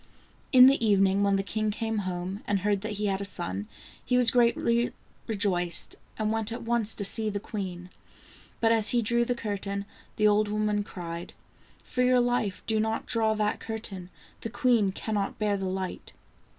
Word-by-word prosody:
In 255 Hz, -1 st, +9 dB
the 270 Hz, -2 st, +5 dB
evening 195 Hz, -2 st, +3 dB
when 200 Hz, -1 st, +3 dB
the 195 Hz, -, 0 dB
king 215 Hz, +2 st, -1 dB
came 220 Hz, +1 st, -2 dB
home, 180 Hz, +3 st, -4 dB
and 200 Hz, -2 st, +1 dB
heard 200 Hz, -1 st, +1 dB
that 215 Hz, 0 st, -4 dB
he 210 Hz, +1 st, -3 dB
had 195 Hz, -1 st, 0 dB
a -, -, -2 dB
son, 100 Hz, -, -2 dB, 0.4 s
he 250 Hz, -, +1 dB
was 245 Hz, -2 st, +5 dB
greatly 235 Hz, 0 st, +2 dB, 0.3 s
rejoiced, 180 Hz, -6 st, 0 dB, 0.2 s
and 215 Hz, 0 st, 0 dB
went 225 Hz, 0 st, -2 dB
at 235 Hz, -, -5 dB
once 230 Hz, -2 st, -1 dB
to 200 Hz, -, -1 dB
see 215 Hz, +2 st, 0 dB
the 205 Hz, -1 st, -3 dB
queen. 185 Hz, -4 st, -6 dB, 0.7 s
But 225 Hz, -1 st, +4 dB
as 225 Hz, -2 st, +3 dB
he 240 Hz, -1 st, +2 dB
drew 235 Hz, +2 st, +2 dB
the 245 Hz, 0 st, -1 dB
curtain, 200 Hz, -2 st, -4 dB, 0.3 s
the 215 Hz, -, +3 dB
old 210 Hz, 0 st, +3 dB
woman 210 Hz, 0 st, 0 dB
cried: 170 Hz, -3 st, -7 dB, 0.3 s
" -, -, -28 dB
For 250 Hz, -, -2 dB
your 250 Hz, 0 st, +4 dB
life 240 Hz, -6 st, 0 dB
do 220 Hz, -1 st, +1 dB
not 220 Hz, +1 st, -1 dB
draw 220 Hz, -2 st, +2 dB
that 210 Hz, -1 st, 0 dB
curtain, 205 Hz, -5 st, -6 dB, 0.3 s
the 225 Hz, -, -5 dB
queen 240 Hz, -4 st, +2 dB
cannot 205 Hz, 0 st, -3 dB
bear 210 Hz, -1 st, +1 dB
the 190 Hz, -1 st, -2 dB
light!" 190 Hz, 0 st, -5 dB
210 Hz, 190 wpm, -28 LUFS, 195-225 Hz, 0.7 s, In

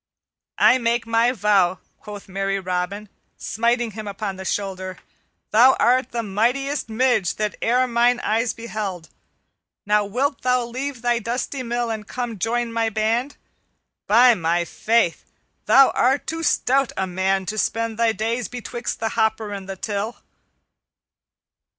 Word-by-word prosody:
"I 260 Hz, -, +5 dB
make 235 Hz, 0 st, 0 dB
my 230 Hz, +1 st, +2 dB
vow," 200 Hz, -5 st, +2 dB, 0.2 s
quoth 205 Hz, -2 st, -10 dB
merry 195 Hz, +1 st, -2 dB
Robin, 185 Hz, +3 st, -3 dB, 0.3 s
smiting 235 Hz, +1 st, 0 dB
him 215 Hz, 0 st, -7 dB
upon 200 Hz, 0 st, -4 dB
the 190 Hz, 0 st, -8 dB
shoulder, 190 Hz, -2 st, -3 dB, 0.5 s
"thou 245 Hz, +5 st, +7 dB
art 255 Hz, +1 st, +3 dB
the 235 Hz, -1 st, -3 dB
mightiest 245 Hz, +8 st, -1 dB
Midge 220 Hz, -5 st, +1 dB
that 210 Hz, -1 st, -2 dB
e'er 250 Hz, +2 st, +2 dB
mine 240 Hz, 0 st, +2 dB
eyes 225 Hz, +2 st, 0 dB
beheld. 210 Hz, -7 st, -6 dB, 0.8 s
Now 210 Hz, 0 st, +3 dB
wilt 260 Hz, +7 st, -1 dB
thou 250 Hz, -1 st, +1 dB
leave 255 Hz, +1 st, -5 dB
thy 240 Hz, -1 st, +2 dB
dusty 245 Hz, +4 st, -3 dB
mill 240 Hz, -1 st, -2 dB
and 215 Hz, -2 st, -5 dB
come 245 Hz, -2 st, -4 dB
and 210 Hz, -5 st, -10 dB
join 235 Hz, 0 st, -1 dB
my 230 Hz, -1 st, +1 dB
band? 225 Hz, +6 st, -1 dB, 0.7 s
By 240 Hz, +3 st, +6 dB
my 170 Hz, -2 st, 0 dB
faith, 220 Hz, 0 st, 0 dB, 0.4 s
thou 270 Hz, -1 st, +7 dB
art 265 Hz, +3 st, +1 dB
too 325 Hz, +1 st, -4 dB
stout 275 Hz, -4 st, +2 dB
a 190 Hz, -, 0 dB
man 190 Hz, +1 st, 0 dB
to 215 Hz, +3 st, -3 dB
spend 230 Hz, 0 st, -1 dB
thy 230 Hz, -1 st, +3 dB
days 225 Hz, +2 st, -2 dB
betwixt 240 Hz, -1 st, -5 dB
the 225 Hz, -, -1 dB
hopper 220 Hz, -1 st, 0 dB
and 195 Hz, -1 st, -7 dB
the 195 Hz, -, -4 dB
till." 205 Hz, +3 st, -4 dB
225 Hz, 150 wpm, -22 LUFS, 200-240 Hz, 0.8 s, thou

